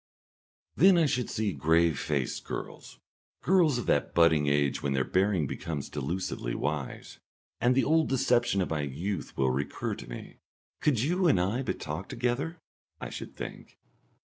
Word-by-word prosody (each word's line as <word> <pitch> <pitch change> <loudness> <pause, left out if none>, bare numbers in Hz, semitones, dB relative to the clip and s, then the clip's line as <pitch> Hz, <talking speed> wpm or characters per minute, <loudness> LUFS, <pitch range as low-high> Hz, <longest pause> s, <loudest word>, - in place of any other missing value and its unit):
Then 185 +5 +6
I 165 - +4
should 125 -4 0
see 105 -3 -1
grave 80 +2 +2
faced 70 -5 -2
girls, - - -7 0.5
girls 165 -7 +4
of 120 - -3
that 70 - +1
budding 80 -3 +4
age 70 -1 +1
when 70 -1 -1
their 65 -1 +1
bearing 95 0 +1
becomes 75 +1 -4
delusively 70 -4 -3
wise, 75 -2 -4 0.4
and 125 +2 +3
the 135 - +3
old 160 +4 +3
deception 120 -6 +2
of - - -6
my 75 -2 0
youth 80 +9 -4
will 65 -1 +2
recur 70 +3 -2
to - - -9
me; - - -9 0.4
"Could 135 -7 +2
you 180 +5 +2
and 100 - +4
I 100 +8 0
but 130 - -3
talk - - -5
together?" 130 +8 -2 0.4
I - - -6
should - - -7
think. - - -8
95 Hz, 165 wpm, -29 LUFS, -, 0.5 s, Then